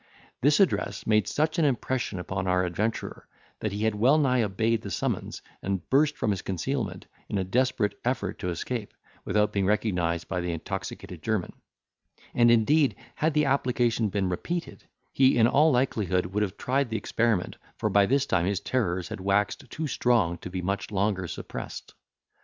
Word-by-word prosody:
This 145 +3 +4
address 100 - +1
made 110 -1 +3
such 155 +3 0
an 160 - +4
impression 130 -5 -1
upon 95 +1 -3
our 90 0 +2
adventurer, 105 +6 -3 0.3
that 110 - -2
he 105 +2 -3
had 110 -1 +2
well 125 +8 +4
nigh 130 -5 +3
obeyed 110 +2 0
the 100 - -6
summons, - - -3 0.2
and 95 -2 -3
burst 150 +2 +3
from 110 - 0
his 95 - -2
concealment, 95 -4 -3 0.2
in 105 - -1
a 95 - +1
desperate 110 -1 0
effort 115 -5 -2
to 90 - -2
escape, 105 +5 -4 0.3
without 105 0 +1
being 100 -2 +1
recognised 90 -6 0
by 90 -2 -2
the 85 -1 -2
intoxicated 85 +1 -6
German; 110 -5 -1 0.8
and 120 -1 +5
indeed, 135 +6 +4 0.2
had 155 0 0
the 150 0 +4
application 120 -5 +1
been 100 -1 0
repeated, 170 - -4 0.3
he 135 -1 +4
in 115 - +6
all 150 +6 +4
likelihood 105 -8 +1
would 100 +4 -2
have 100 -2 -2
tried 135 0 0
the 110 - -1
experiment, 115 -6 0 0.2
for - - 0
by 100 0 +5
this 140 +3 +2
time 90 -7 +1
his 100 -1 0
terrors 95 -7 -1
had - - -5
waxed 105 +7 0
too 160 - -4
strong 120 - +2
to - - -7
be 90 0 -4
much 100 +2 -2
longer 95 -2 0
suppressed. - - -7
105 Hz, 175 wpm, -27 LUFS, 95-130 Hz, 0.8 s, in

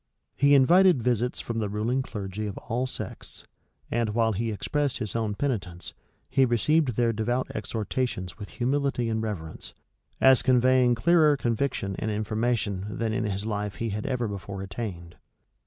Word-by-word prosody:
He 140 0 +5
invited 170 +1 +5
visits 125 0 0
from 115 -1 -3
the 105 -2 -1
ruling 110 +6 0
clergy 105 -3 -5
of 100 - -6
all 125 +3 -2
sects; - - -8 0.5
and 115 -2 0
while 115 -1 +3
he 110 +2 -2
expressed 145 +6 -1
his 110 -5 -5
own 110 -3 -1
penitence, 100 -10 -3 0.3
he 135 - +3
received 130 +2 +2
their 115 0 +2
devout 120 +4 -1
exhortations 110 -2 -3
with 100 - -7
humility 130 -1 0
and 110 0 -1
reverence, 90 -8 -5 0.4
as 130 -1 +6
conveying 125 -1 +4
clearer 155 +2 +4
conviction 115 -5 -1
and 110 - -2
information 110 -2 -1
than 115 -1 -1
in 115 -1 -1
his 100 0 -3
life 105 -2 -3
he 115 +5 -3
had 105 +1 -3
ever 125 -3 -1
before 100 -1 -6
attained. 95 -4 -6
115 Hz, 155 wpm, -27 LUFS, 105-130 Hz, 0.5 s, as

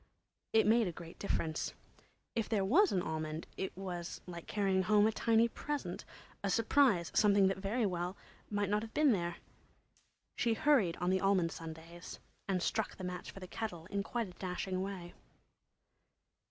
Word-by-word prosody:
It 225 - +5
made 225 0 +4
a - - -1
great 165 0 -11
difference. 160 -5 -1 0.6
If 225 -2 -1
there 205 -4 +2
was 350 - +5
an 180 -2 +1
almond 155 0 -3
it 190 - -4
was 180 -3 -5
like 170 -2 -8
carrying 195 -2 +2
home 205 +2 +4
a 220 - +4
tiny 225 +1 +3
present—a 285 -6 -5
surprise—something 205 - +4
that 190 +1 +2
might - - -9
very 215 +4 0
well 180 0 -2 0.3
not 205 0 +1
have 225 0 -8
been 300 -2 +5
there. 175 -5 0 1.0
She 230 -2 +2
hurried 220 - +3
on 180 +1 0
the 190 0 +2
almond 190 -4 +3
Sundays 165 +2 -8 0.3
and 190 -2 0
struck 220 -1 -1
the 190 - -7
match 180 -1 -5
for - - -9
the 185 - -7
kettle 175 -6 -5
in 200 0 0
quite 230 +2 -2
a - - -10
dashing 185 0 -2
way. 190 -3 -5
195 Hz, 165 wpm, -34 LUFS, 175-220 Hz, 1.0 s, It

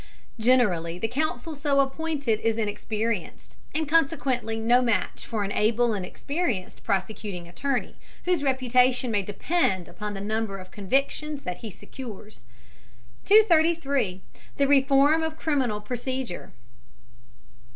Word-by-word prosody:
Generally 205 -9 +3
the 225 - -1
counsel 305 +4 -2
so 285 -1 +1
appointed 275 -4 0
is 225 0 0
inexperienced, 215 -1 -3 0.2
and 315 -1 0
consequently 270 -7 +1
no 240 +3 +4
match 230 -6 -1
for 220 -3 -2
an 200 - -3
able 225 +3 +2
and 195 -3 -3
experienced 250 - -3
prosecuting 195 -2 -3
attorney, 250 +9 -2 0.3
whose 355 -4 +2
reputation 255 -2 +2
may 205 -2 +2
depend 195 - 0
upon 205 +4 -6
the - - -5
number 215 0 -2
of 185 -1 -11
convictions 275 +7 -1
that 180 -1 -4
he 225 - -6
secures. 215 - -10 0.8
233. 315 - +3 0.3
THE 280 - +3
REFORM 280 +3 +5
OF 320 0 -3
CRIMINAL 260 -9 0
PROCEDURE. 250 -2 -4
245 Hz, 120 wpm, -26 LUFS, 210-280 Hz, 0.8 s, REFORM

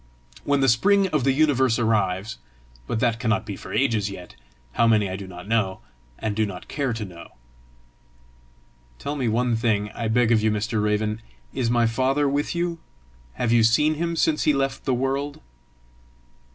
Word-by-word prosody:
When 140 -1 +2
the 135 - +3
spring 195 - +4
of 150 -6 0
the 135 - +4
universe 135 -4 +2
arrives, 105 -3 0 0.5
but 110 - -2
that 115 -1 +1
cannot 110 -1 0
be 105 -2 -5
for - - -10
ages 115 -7 +1
yet! 90 -2 -10 0.4
how 115 - +2
many, 105 -3 +3
I 95 - -4
do 95 0 -7
not 90 +1 -10
know 105 -4 0 0.4
and 110 -2 -3
do 110 - +1
not 95 -4 -6
care 140 -4 -2
to 115 -2 -4
know." 85 -3 -12 1.6
"Tell 145 - -4
me 130 -4 -1
one 120 +2 +1
thing, 105 -3 0
I 115 - -4
beg 120 +1 +2
of 110 -2 +4
you, 110 - +2
Mr. 105 +1 -1
Raven: 105 +1 0 0.3
is 120 -3 -1
my 120 0 +3
father 130 +5 +1
with 145 +4 -1
you? 170 -1 -2 0.5
Have 115 - -1
you 120 -1 +5
seen 150 +8 +4
him 170 +2 -2
since 160 -2 +1
he 150 - +4
left 135 -1 -2
the 130 - +1
world?" 135 +3 -2
115 Hz, 180 wpm, -24 LUFS, 105-135 Hz, 1.6 s, you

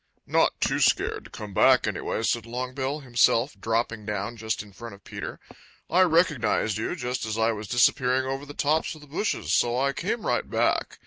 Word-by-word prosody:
"Not - - +2
too - - +1
scared - - +1
to - - -12
come 105 -2 -8
back, - - +5
anyway," 110 - -2
said 115 0 0
Longbill 130 +4 -3
himself, 120 +1 +2
dropping 115 -1 -1
down 105 +2 -3
just 110 -1 -3
in 105 -1 -16
front 115 +2 -9
of 100 - -21
Peter. - - -7 0.5
"I 180 - +5
recognized 155 - +2
you 110 - -2
just 125 -5 -3
as 110 0 -3
I 115 +1 +2
was 105 -1 -6
disappearing 125 +3 +3
over 135 +1 -3
the 145 - -10
tops 155 +3 0
of 155 - -14
the 150 - -14
bushes, 165 +9 -2
so 120 0 +2
I 140 +1 +1
came 210 - -3
right - - 0
back. - - 0
120 Hz, 195 wpm, -26 LUFS, 110-140 Hz, 0.5 s, back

